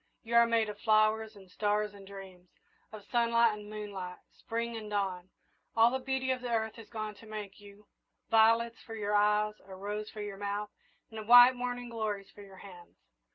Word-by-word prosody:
You 230 0 -6
are 235 0 +6
made 230 -1 +2
of 205 -1 -7
flowers 215 0 +2
and 195 -2 -15
stars 210 +2 -1
and 200 -1 -13
dreams 190 -2 -11 0.4
of 215 -2 -10
sunlight 235 -1 +3
and 210 0 -9
moonlight, 200 -4 -6 0.2
Spring 230 0 -4
and 215 -2 -7
dawn. 190 -3 -2 0.5
All 230 +1 +6
the 260 - -1
beauty 265 0 -1
of 255 -1 -2
the 250 - -5
earth 220 -1 0
has 225 -2 -12
gone 215 -2 -5
to 220 +2 -16
make 210 -2 -7
you 205 0 -15 0.4
violets 230 +1 +3
for 225 - -9
your 210 -1 -2
eyes, 210 0 +3
a 190 -1 -11
rose 210 +2 -5
for 215 - -8
your 200 -1 -6
mouth, 205 +1 -3 0.4
and 220 -1 -8
white 245 +1 +9
morning 245 0 -4
glories 215 -4 -4
for 205 - -14
your 195 -1 -13
hands. 180 -3 -14
215 Hz, 195 wpm, -31 LUFS, 205-230 Hz, 0.5 s, white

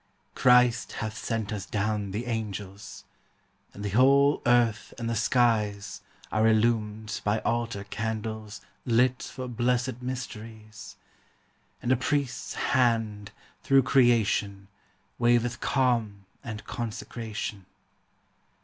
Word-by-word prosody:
Christ 125 -1 +4
hath 110 -1 -4
sent 110 -1 -3
us 100 -2 -5
down 105 -1 -1
the 105 +5 -4
angels; 105 -4 -5 0.7
And 100 - -8
the 100 - -2
whole 140 +5 +5
earth 120 -2 +2
and 115 - -4
the 115 - -1
skies 110 -4 +1 0.3
Are 110 +2 +3
illumed 110 -1 +1
by 105 +1 +1
altar 115 -3 -1
candles 110 0 -5
TRUTH. - - -28 0.2
35 115 - +1
Lit 125 +1 +3
for 130 -1 -5
blessed 125 +1 -1
mysteries; 110 -5 -7 0.9
And 120 - 0
a - - +6
Priest's 135 0 -2 0.2
Hand, 115 -5 +1 0.3
through 135 -1 +4
creation, 110 -6 +2 0.5
Waveth 120 0 +2
calm 115 -7 0 0.2
and 110 -2 -7
consecration. 110 -4 -5
115 Hz, 115 wpm, -27 LUFS, 105-120 Hz, 0.9 s, a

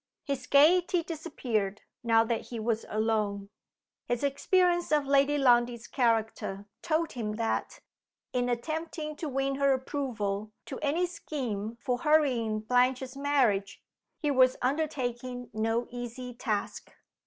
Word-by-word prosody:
His 275 -3 -4
gayety 340 +4 +5
disappeared, 250 - -3 0.2
now 225 -1 +4
that 230 0 -2
he 235 - -5
was 220 0 -1
alone. 210 -2 -1 0.6
His 240 +1 -1
experience 350 +5 +2
of 300 -2 +3
Lady 280 +1 +3
Lundie's 240 -3 +3
character 225 -5 0 0.2
told 325 -1 0
him 220 -4 -3
that, 225 0 -2 0.5
in 245 0 +1
attempting 310 +5 -3
to 315 - -4
win 270 0 -1
her 275 -1 +4
approval 220 -7 -3
to 265 - -6
any 310 +4 +1
scheme 235 - -4
for 245 0 -1
hurrying 250 -8 +2
Blanche's 250 +3 +1
marriage, 260 -9 +1 0.4
he 295 -4 0
was 255 -1 +4
undertaking 255 -3 -2
no 225 +2 0
easy 245 +1 -6
task. 220 -4 -3
250 Hz, 125 wpm, -29 LUFS, 225-290 Hz, 0.6 s, gayety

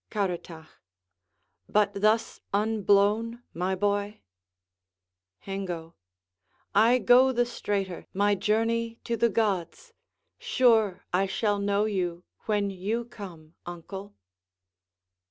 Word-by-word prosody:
Caratach 175 -5 -3 1.0
But 210 -1 +2
thus 215 +3 +1
unblown, 215 +2 +2
my 180 +3 -1
boy? 205 +2 -1 1.2
Hengo 180 -4 -5 0.8
I 225 +5 +5
go 255 +1 +5
the 245 -1 +1
straighter 200 -6 -3
My 205 +2 +2
journey 225 +3 0
to 235 - -1
the 235 +1 +2
gods. 210 - -2 0.5
Sure, 220 -7 +2
I 190 +2 +2
shall 205 +1 0
know 200 +1 +1
you 180 -4 -2 0.2
When 205 -2 +1
you 210 +6 -2
come, 175 -9 -11
uncle. 190 +4 -8
205 Hz, 100 wpm, -27 LUFS, 190-225 Hz, 1.2 s, I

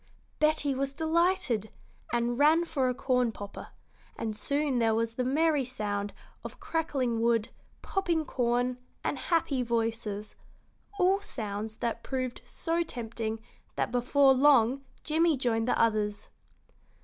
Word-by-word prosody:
Betty 305 -2 +2
was 270 +1 -2
delighted, 320 - +1 0.4
and 240 +1 0
ran 315 +4 +5
for 275 -6 0
a 250 - -1
corn 250 -2 +1
popper, 205 -2 -8 0.5
and 220 -2 -3
soon 280 +4 0
there 225 -1 +3
was 230 0 0
the 250 - -1
merry 295 +2 +2
sound 205 -5 -3 0.3
of - - -8
crackling 270 -8 -1
wood, 230 -2 +2 0.3
popping 340 -5 0
corn, 245 0 0 0.2
and - - 0
happy 315 -6 +1
voices 225 -3 -2 0.6
all 385 +1 +3
sounds 215 - -4
that 230 0 -3
proved 255 -1 -3
so 335 0 -2
tempting 225 -6 -4 0.3
that - - -1
before 265 +3 +4
long 265 -1 +4 0.2
Jimmie 320 0 +2
joined 230 -2 0
the - - +1
others. 210 -2 +1
250 Hz, 130 wpm, -29 LUFS, 225-300 Hz, 0.6 s, ran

